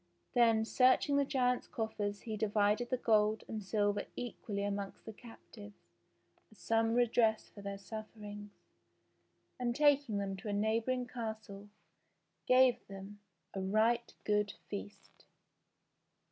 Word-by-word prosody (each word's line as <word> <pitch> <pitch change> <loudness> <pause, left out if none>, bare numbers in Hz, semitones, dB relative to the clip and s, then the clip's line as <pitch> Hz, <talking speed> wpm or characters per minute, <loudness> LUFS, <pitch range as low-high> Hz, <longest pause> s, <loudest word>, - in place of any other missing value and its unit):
Then, 230 -2 +4
searching 255 +4 +4
the 280 - +3
giants' 250 -2 +1
coffers 205 -3 -3
he 220 -2 -4
divided 210 +2 +1
the 255 - +1
gold 215 -2 +2
and 220 -1 -4
silver 205 +1 0
equally 210 -4 -4
amongst 200 -1 -4
the 220 - -7
captives 210 -2 -13 0.8
as 215 - -19
some 225 +5 +1
redress 230 -2 +2
for 205 - -10
their 200 0 -5
sufferings, 210 0 -8 1.1
and 240 -1 -1
taking 285 -6 +3
them 195 -1 -2
to 215 +4 -9
a - - -1
neighbouring 225 +4 0
castle 220 -4 -6 0.8
gave 255 -1 +4
them 195 +1 -9 0.3
a 195 - -3
right 220 +5 +2
good 210 -1 +1 0.2
feast. 205 0 -8
220 Hz, 125 wpm, -34 LUFS, 205-240 Hz, 1.1 s, Then